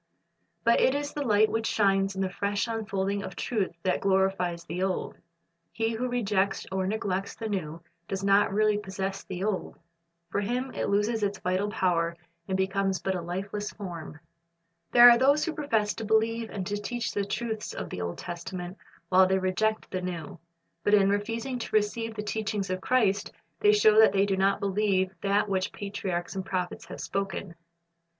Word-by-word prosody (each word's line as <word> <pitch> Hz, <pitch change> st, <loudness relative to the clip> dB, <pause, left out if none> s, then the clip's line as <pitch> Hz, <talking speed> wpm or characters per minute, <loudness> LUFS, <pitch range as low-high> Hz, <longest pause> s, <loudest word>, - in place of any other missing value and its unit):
'" -, -, -47 dB
But 235 Hz, -, +4 dB
it 260 Hz, -, +4 dB
is 290 Hz, 0 st, -3 dB
the 295 Hz, -, -3 dB
light 215 Hz, -5 st, +4 dB
which 225 Hz, 0 st, 0 dB
shines 195 Hz, -1 st, +2 dB
in 190 Hz, -, -2 dB
the 190 Hz, -, -1 dB
fresh 200 Hz, +3 st, -1 dB
unfolding 200 Hz, -3 st, -2 dB
of -, -, -7 dB
truth 215 Hz, -6 st, -1 dB
that 185 Hz, -, +1 dB
glorifies 190 Hz, -3 st, +1 dB
the 175 Hz, +2 st, -4 dB
old. 190 Hz, -1 st, -1 dB, 0.6 s
He 225 Hz, 0 st, -1 dB
who 250 Hz, +3 st, -2 dB
rejects 200 Hz, -5 st, 0 dB
or 190 Hz, 0 st, -1 dB
neglects 195 Hz, -2 st, -2 dB
the 225 Hz, -, -5 dB
new, 170 Hz, -5 st, -4 dB, 0.2 s
does 195 Hz, 0 st, -3 dB
not 200 Hz, +1 st, +4 dB
really 210 Hz, +1 st, +2 dB
possess 195 Hz, -1 st, -4 dB
the 185 Hz, 0 st, -5 dB
old. 205 Hz, -2 st, -2 dB, 0.5 s
For 200 Hz, -, 0 dB
him 250 Hz, +5 st, -2 dB
it -, -, -2 dB
loses 210 Hz, +3 st, +1 dB
its 200 Hz, -1 st, 0 dB
vital 185 Hz, +3 st, -1 dB
power, 170 Hz, -4 st, 0 dB, 0.3 s
and 190 Hz, -, 0 dB
becomes 190 Hz, 0 st, 0 dB
but 190 Hz, -, -1 dB
a 180 Hz, -, -3 dB
lifeless 195 Hz, +4 st, -4 dB
form. 170 Hz, -6 st, -7 dB, 0.7 s
There 240 Hz, 0 st, +10 dB
are 235 Hz, -1 st, +8 dB
those 280 Hz, +3 st, +4 dB
who 330 Hz, -, -2 dB
profess 225 Hz, -9 st, 0 dB
to 225 Hz, -, -6 dB
believe 225 Hz, +1 st, +1 dB
and 190 Hz, -3 st, -4 dB
to 205 Hz, +3 st, -2 dB
teach 240 Hz, +2 st, -3 dB
the 205 Hz, -, -1 dB
truths 220 Hz, +2 st, -3 dB
of -, -, -6 dB
the 90 Hz, -, -4 dB
Old 85 Hz, 0 st, -3 dB
Testament, 175 Hz, +2 st, -6 dB, 0.3 s
while 185 Hz, 0 st, +6 dB
they 190 Hz, 0 st, +2 dB
reject 190 Hz, +4 st, 0 dB
the 185 Hz, -, -2 dB
New. 170 Hz, -3 st, -5 dB, 0.4 s
But 205 Hz, -, +5 dB
in 195 Hz, -1 st, +4 dB
refusing 230 Hz, +5 st, -2 dB
to 225 Hz, -, -4 dB
receive 220 Hz, +2 st, 0 dB
the 210 Hz, -, -4 dB
teachings 210 Hz, -2 st, -2 dB
of 185 Hz, 0 st, -2 dB
Christ, 205 Hz, -6 st, +2 dB, 0.3 s
they 210 Hz, -, +5 dB
show 210 Hz, +1 st, +5 dB
that 220 Hz, -3 st, +7 dB
they 195 Hz, 0 st, +3 dB
do 195 Hz, -1 st, 0 dB
not 195 Hz, +1 st, +2 dB
believe 195 Hz, -2 st, +1 dB
that 200 Hz, +1 st, +2 dB
which 190 Hz, -1 st, -1 dB
patriarchs 190 Hz, -4 st, -4 dB
and 190 Hz, -, -2 dB
prophets 185 Hz, -2 st, -3 dB
have -, -, -9 dB
.spoken. 195 Hz, -2 st, -3 dB
200 Hz, 185 wpm, -28 LUFS, 190-220 Hz, 0.7 s, There